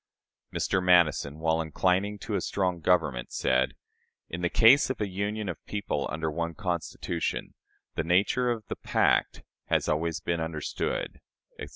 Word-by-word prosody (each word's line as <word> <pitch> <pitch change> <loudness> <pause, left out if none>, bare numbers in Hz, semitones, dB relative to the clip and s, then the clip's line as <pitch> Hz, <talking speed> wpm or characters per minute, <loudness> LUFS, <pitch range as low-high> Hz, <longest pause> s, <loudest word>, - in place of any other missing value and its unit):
" - - -57
Mr. 95 - +1
Madison, 85 -5 +3
while 80 +1 +1
inclining 95 +6 0
to 105 - -6
a 100 - +1
strong 90 -2 -1
government, 80 -8 +1
said: 65 0 +1 0.5
"In 85 - -5
the 90 - +1
case 120 +9 +6
of 130 - -3
a 105 - 0
union 100 +2 -3
of 90 -4 -5
people 105 -1 -2
under 80 +1 -2
one 85 +1 -3
Constitution, 85 -2 -3 0.4
the 80 - -1
nature 100 +9 +2
of 115 -3 -2
the - - -5
pact - - +1 0.2
has - - +1
always 80 +1 0
been 85 +1 -2
understood," 80 -2 -3 0.4
etc. - - -6
90 Hz, 160 wpm, -28 LUFS, 80-100 Hz, 0.5 s, case